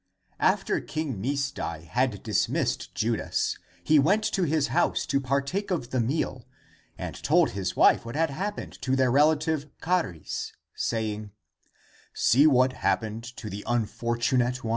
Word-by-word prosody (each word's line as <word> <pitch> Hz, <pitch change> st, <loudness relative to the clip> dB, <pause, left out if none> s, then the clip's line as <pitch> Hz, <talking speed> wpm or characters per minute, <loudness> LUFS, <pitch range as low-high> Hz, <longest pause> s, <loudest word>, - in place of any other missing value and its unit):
After -, -, +2 dB
King 150 Hz, -10 st, -4 dB
Misdai 135 Hz, -, -3 dB
had 110 Hz, +3 st, -1 dB
dismissed 110 Hz, -4 st, -1 dB
Judas, -, -, -1 dB, 0.2 s
he 155 Hz, -1 st, +5 dB
went 195 Hz, +10 st, +3 dB
to 195 Hz, -4 st, +1 dB
his 155 Hz, -2 st, +1 dB
house -, -, +1 dB
to 140 Hz, -, 0 dB
partake 140 Hz, +9 st, -1 dB
of 160 Hz, -10 st, -2 dB
the 130 Hz, -, 0 dB
meal 125 Hz, 0 st, -1 dB, 0.5 s
and -, -, -5 dB
told -, -, +3 dB
his 95 Hz, -1 st, -3 dB
wife -, -, +5 dB
what 115 Hz, +2 st, -7 dB
had 160 Hz, -1 st, +1 dB
happened 200 Hz, +8 st, -5 dB
to 130 Hz, 0 st, +1 dB
their 130 Hz, -2 st, +3 dB
relative 150 Hz, +1 st, +2 dB
Charis, 160 Hz, -, -2 dB, 0.2 s
saying, 110 Hz, -2 st, -2 dB, 0.5 s
*' -, -, -31 dB, 0.2 s
See 140 Hz, +6 st, +7 dB
what 130 Hz, -2 st, +4 dB
happened 110 Hz, -2 st, -1 dB
to 110 Hz, -, -7 dB
the 105 Hz, 0 st, -6 dB
unfortunate 120 Hz, +2 st, 0 dB
one 115 Hz, -, -3 dB
130 Hz, 145 wpm, -27 LUFS, 115-155 Hz, 0.5 s, See